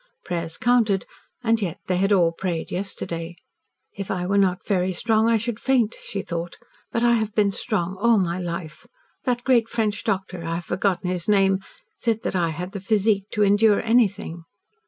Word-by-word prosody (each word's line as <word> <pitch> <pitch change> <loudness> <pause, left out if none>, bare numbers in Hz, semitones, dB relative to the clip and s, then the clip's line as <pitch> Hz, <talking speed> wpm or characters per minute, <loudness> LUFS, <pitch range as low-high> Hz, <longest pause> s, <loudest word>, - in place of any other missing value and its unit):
Prayers 170 -2 -3
counted 230 -6 +2 0.4
and, 225 -1 +2
yet, 180 -5 -2
they 185 - 0
had 195 +2 +2
all 175 -4 +4
prayed 170 -1 -3
yesterday. 175 -3 -4 0.6
"If 195 -1 -6
I 180 -1 -1
were 195 +2 0
not 185 -2 +1
very 185 -2 +1
strong, 220 +4 +2
I 230 - +4
should 230 0 -3
faint," 245 -4 +2
she 200 - -5
thought. 170 0 -5 0.3
"But 230 - 0
I 240 0 +5
have 220 -2 0
been 205 -2 +3
strong 190 -4 -2
all 235 0 +5
my 180 -2 0
life. 170 -3 -6 0.4
That 245 -2 0
great 240 -4 +3
French 215 -3 -1
doctor 190 -5 -2
I 165 0 -2
have 170 - -5
forgotten 180 -1 0
his 180 +1 -3
name 195 -2 +4 0.4
said 225 -2 -1
that - - -2
I 170 -2 +2
had 175 +4 -5
the 200 - -6
physique 200 -1 +1
to 210 - +2
endure 205 +1 +4
anything." 205 -7 +1
195 Hz, 185 wpm, -24 LUFS, 180-220 Hz, 0.6 s, I